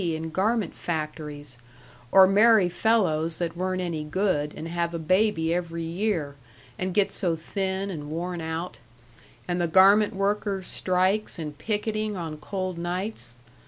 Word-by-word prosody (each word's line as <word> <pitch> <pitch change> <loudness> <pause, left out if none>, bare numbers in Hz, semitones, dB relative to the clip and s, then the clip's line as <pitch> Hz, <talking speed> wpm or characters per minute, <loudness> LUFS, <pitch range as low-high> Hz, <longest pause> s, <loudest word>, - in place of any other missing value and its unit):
in 160 -2 -2
garment 205 +2 0
factories, 150 -5 -5 0.5
or 190 -1 +9
marry 205 0 +5
fellows 170 -5 +1
that 170 -1 -3
weren't 185 +1 -1
any 165 -3 -3
good 150 -2 0
and 160 - -5
have 170 0 -2
a - - -1
baby 170 0 +2
every 170 -1 -3
year, 165 -4 -2 0.4
and 185 0 -2
get 205 -2 +3
so 175 -3 +1
thin 190 +4 -3
and 150 -4 -6
worn 175 +2 -3
out; 160 +2 -4 0.7
and 175 0 -1
the 170 - +1
garment 195 +4 +5
workers' 195 -1 -1
strikes 185 +5 0
and 150 -3 -6
picketing 215 +1 -2
on 165 -3 -4
cold 185 +2 -4
nights. 180 - -3
180 Hz, 145 wpm, -26 LUFS, 160-195 Hz, 0.7 s, or